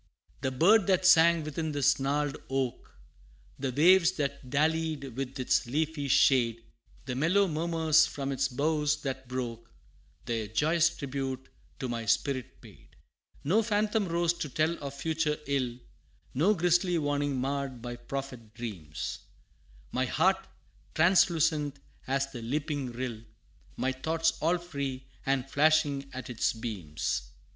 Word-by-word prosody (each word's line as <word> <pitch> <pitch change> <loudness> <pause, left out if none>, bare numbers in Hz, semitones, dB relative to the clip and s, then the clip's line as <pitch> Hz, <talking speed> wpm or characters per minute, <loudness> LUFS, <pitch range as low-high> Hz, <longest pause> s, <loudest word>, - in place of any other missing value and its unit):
The 130 - 0
bird 190 - +4
that 185 -1 +2
sang 170 -2 +6
within 155 +1 -3
this 145 -2 +3
gnarled 145 +1 0
oak, 135 -2 -2 0.7
The 135 -1 -1
waves 175 +6 +5
that 140 -5 -3
dallied 155 -2 0
with 135 0 -4
its 130 -1 +1
leafy 150 +2 -1
shade, 120 -3 +3 0.4
The 125 - -3
mellow 170 +9 +3
murmurs 160 -1 +3
from 140 -1 -4
its 135 0 +1
boughs 150 +2 0
that 130 -2 -4
broke, 115 -3 -5 0.5
Their 115 -2 -2
joyous 155 +10 +3
tribute 135 -4 -5 0.3
to 130 - -4
my 115 -2 -3
spirit 130 +3 -1
paid. - - -17 0.5
No 190 +10 +3
phantom 215 -1 0
rose 170 0 +1
to 150 - -3
tell 155 +5 +1
of 140 0 -5
future 155 +1 -1
ill, 130 -4 -1 0.6
No 185 +11 +3
grisly 175 0 +2
warning 145 -3 0
marr'd 135 -2 -3
my 120 -1 -5
prophet 120 -2 -7
dreams 95 -11 -5 0.7
My 130 +1 0
heart 190 +8 +1 0.5
translucent 160 -4 +3 0.3
as 135 +1 0
the 125 -4 -7
leaping 140 +1 -2
rill, 120 -2 -5 0.6
My 130 - 0
thoughts 160 +5 0
all 170 +3 +2
free 140 -6 -5 0.2
and 135 -1 +1
flashing 145 -1 +2
at 130 0 -7
its 120 -3 0
beams. 80 - -4
140 Hz, 135 wpm, -29 LUFS, 130-160 Hz, 0.7 s, sang